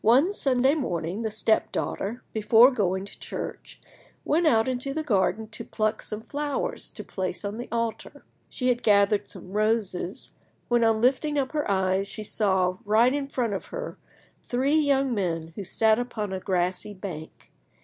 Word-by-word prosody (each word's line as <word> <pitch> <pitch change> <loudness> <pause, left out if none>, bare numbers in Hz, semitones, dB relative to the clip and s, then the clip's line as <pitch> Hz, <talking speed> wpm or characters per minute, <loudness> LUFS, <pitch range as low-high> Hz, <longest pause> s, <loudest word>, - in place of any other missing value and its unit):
One 265 - +5
Sunday 265 -5 +2
morning 180 - -2
the 220 - -1
step 220 +1 +1
daughter, 225 +6 -3
before 225 +4 +6
going 190 -5 0
to - - -12
church, - - -6 0.5
went 325 +2 +2
out 225 -5 +4
into 260 +2 -2
the 315 - -1
garden 220 -3 +1
to 215 - -7
pluck 215 0 -1
some 215 0 -4
flowers 290 +2 -3
to - - -7
place 185 +1 -3
on 205 +3 -4
the 245 - -5
altar. 230 -1 -3 0.2
She 255 -1 -1
had 245 -1 +1
gathered 205 0 +3
some 185 -1 -10
roses, 210 -3 -1 0.4
when, 240 -1 +3
on 225 -1 +3
lifting 275 +4 +2
up 265 -2 0
her 300 -6 -1
eyes, 190 0 +1
she 215 - -5
saw, 190 -3 +1
right 225 +5 +4
in 285 -1 -2
front 245 -6 -1
of 195 - -4
her, - - -6 0.4
three 260 +4 0
young 275 -3 +2
men 165 -5 -2
who 200 - -5
sat 220 +4 +3
upon 220 -5 -3
a 190 - -2
grassy 185 +2 -1
bank. 175 -5 -8
220 Hz, 170 wpm, -26 LUFS, 195-255 Hz, 0.5 s, before